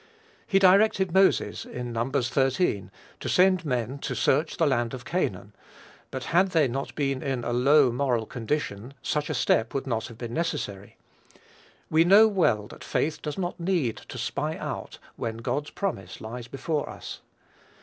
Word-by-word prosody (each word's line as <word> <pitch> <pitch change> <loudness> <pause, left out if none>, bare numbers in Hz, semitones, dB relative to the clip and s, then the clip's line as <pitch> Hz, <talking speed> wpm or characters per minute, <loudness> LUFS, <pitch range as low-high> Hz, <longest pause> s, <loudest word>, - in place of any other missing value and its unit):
He 195 - +3
directed 190 -1 +4
Moses, 190 0 +3
in 120 -1 -6
Num. 115 +3 -1
xiii. 130 - +1 0.3
to - - -4
send 185 -1 +4
men 125 0 -2
to 135 -2 -3
search 140 +6 +1
the 165 - +3
land 120 -3 +1
of 125 - -10
Canaan; 100 - -2 0.6
but 130 -1 -5
had 180 +3 +3
they 165 -6 +3
not 135 +3 -4
been 135 -3 -1
in 135 -4 -2
a 120 - -2
low 135 +2 +5
moral 120 -3 0
condition 120 0 -3
such 150 0 -1
a 155 - -1
step 115 -1 +1
would 135 - -1
not 115 -4 -2
have 115 -3 -12
been 120 -1 -6
necessary. 130 - -3 0.9
We 160 +1 +5
know 200 +5 +7
well 165 - +2
that - - -11
faith 155 0 -1
does 150 -2 -4
not 180 -2 -3
need 170 - 0
"to - - -10
spy 140 +6 -2
out" - - -5 0.2
when 115 -1 -3
God's 145 +5 -2
promise 95 - -4
lies 115 +2 -7
before 145 +4 -2
us. - - -8
135 Hz, 170 wpm, -26 LUFS, 120-165 Hz, 0.9 s, know